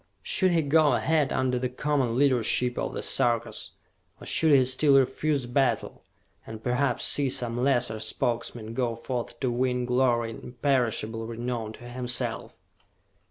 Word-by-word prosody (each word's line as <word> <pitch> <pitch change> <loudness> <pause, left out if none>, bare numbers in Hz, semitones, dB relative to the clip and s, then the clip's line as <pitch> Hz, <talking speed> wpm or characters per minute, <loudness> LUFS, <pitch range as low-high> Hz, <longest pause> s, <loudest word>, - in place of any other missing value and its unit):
Should 190 -2 +2
he 170 -2 +2
go 145 0 +3
ahead 150 +2 +1
under 130 -1 0
the 125 0 -2
common 130 -2 -1
leadership 125 -2 +2
of - - -3
the - - -4
Sarkas? 120 -1 0 0.5
Or - - -11
should 160 -1 +2
he 135 -3 +5
still 135 +2 +3
refuse 135 +1 0
battle 130 +2 -1 0.5
and 110 0 -9
perhaps 125 +3 0
see 140 -2 +3
some 120 -2 -2
lesser 120 -3 +1
Spokesman 115 0 -3
go 120 -1 -1
forth 120 0 -5
to 130 -3 0
win 125 0 0
glory 120 -2 +1
and 110 - -10
imperishable 120 -3 -1
renown 115 -1 -4
to 120 - -13
himself? 125 0 -3
125 Hz, 150 wpm, -26 LUFS, 120-135 Hz, 0.5 s, he